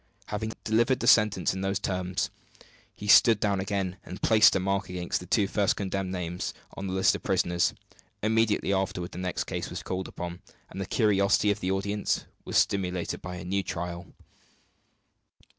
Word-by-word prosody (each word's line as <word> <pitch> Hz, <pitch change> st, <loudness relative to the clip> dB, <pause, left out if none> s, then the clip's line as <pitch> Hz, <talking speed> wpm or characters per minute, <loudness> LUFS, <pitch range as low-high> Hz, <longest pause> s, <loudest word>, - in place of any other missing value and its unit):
Having 110 Hz, +1 st, -3 dB
delivered 120 Hz, +4 st, +2 dB
the -, -, -2 dB
sentence 105 Hz, -6 st, +4 dB
in 95 Hz, -, -4 dB
those 95 Hz, 0 st, 0 dB
terms, 90 Hz, 0 st, -2 dB, 0.6 s
he 105 Hz, -, -8 dB
sat 110 Hz, +1 st, +7 dB
down 100 Hz, -2 st, +1 dB
again, 95 Hz, -1 st, -2 dB
and 90 Hz, -, -8 dB
placed 110 Hz, 0 st, +5 dB
a -, -, +2 dB
mark 95 Hz, +1 st, -1 dB
against 90 Hz, -1 st, -2 dB
the 90 Hz, -, -10 dB
two 100 Hz, +2 st, +3 dB
first 100 Hz, 0 st, +1 dB
condemned 95 Hz, -1 st, -3 dB
names 90 Hz, -1 st, -4 dB, 0.2 s
on 95 Hz, -, -5 dB
the 95 Hz, -, -3 dB
list 95 Hz, 0 st, +4 dB
of -, -, -5 dB
prisoners. 85 Hz, 0 st, +1 dB, 0.5 s
Immediately 110 Hz, -2 st, +2 dB
afterward 95 Hz, -2 st, -2 dB
the -, -, -7 dB
next 90 Hz, -1 st, -2 dB
case -, -, -4 dB
was -, -, -6 dB
called 95 Hz, 0 st, -4 dB
on, 85 Hz, 0 st, -5 dB, 0.3 s
and 95 Hz, -, -5 dB
the 95 Hz, -, -4 dB
curiosity 105 Hz, -2 st, +3 dB
of 105 Hz, -, -2 dB
the 90 Hz, -, -2 dB
audience 100 Hz, +2 st, -1 dB, 0.2 s
was -, -, 0 dB
stimulated 90 Hz, -3 st, 0 dB
by 90 Hz, 0 st, -6 dB
a 90 Hz, -, -7 dB
new 100 Hz, +2 st, 0 dB
trial. 85 Hz, -1 st, -5 dB
95 Hz, 175 wpm, -28 LUFS, 90-105 Hz, 0.6 s, sat